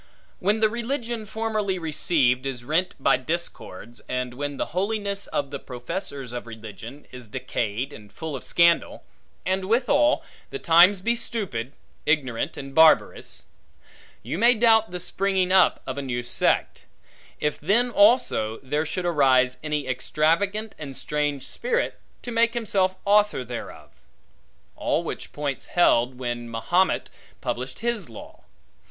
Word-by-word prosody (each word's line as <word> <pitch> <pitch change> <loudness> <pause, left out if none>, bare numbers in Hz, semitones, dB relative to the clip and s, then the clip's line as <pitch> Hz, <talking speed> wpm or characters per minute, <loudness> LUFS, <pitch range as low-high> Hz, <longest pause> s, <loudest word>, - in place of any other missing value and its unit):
When 205 +4 +1
the 215 - +6
religion 235 -1 -3
formerly 215 -3 -1
received, 145 -5 +1
is 125 -3 -4
rent 165 +7 0
by - - +4
discords; 130 - -5
and 125 -1 -2
when 145 +2 -4
the - - -4
holiness 200 +1 -1
of 140 -1 -2
the 140 - -4
professors 135 +1 -6
of 120 -1 -6
religion, 110 +4 -10
is 125 -2 -10
decayed 125 +1 -3
and 105 -1 -13
full 160 +5 -6
of 130 - -7
scandal; 170 -1 +2 0.4
and 190 +1 0
withal 255 +8 +3 0.3
the 415 - -5
times 180 - +6
be 235 +4 +1
stupid, 170 - -2 0.3
ignorant, 140 -2 0
and 135 -1 -7
barbarous; 160 +1 +4 0.8
you 130 - -4
may 240 +2 +6
doubt 225 -1 +4
the 180 0 -5
springing 190 0 0
up 190 -1 +4
of 130 +1 -4
a - - -2
new 120 -3 -3
sect; 120 - 0 0.5
if 150 -1 -1
then 230 +10 +2
also, 205 - +3
there 150 +4 -1
should 180 +3 -3
arise 130 -6 +3
any 150 -3 -2
extravagant 165 - 0
and 140 -4 -7
strange 145 -2 -2
spirit, 485 - -1 0.2
to 245 - -5
make 230 +1 +2
himself 195 -5 +1
author 205 -9 +3
thereof. 120 0 -8 0.8
All - - 0
which - - -6
points 145 -2 -4
held, 125 -7 +3
when 120 -2 -4
Mahomet 155 +11 +1 0.3
published 130 - -4
his 235 - -1
law. 115 - -12
155 Hz, 140 wpm, -25 LUFS, 130-205 Hz, 0.8 s, the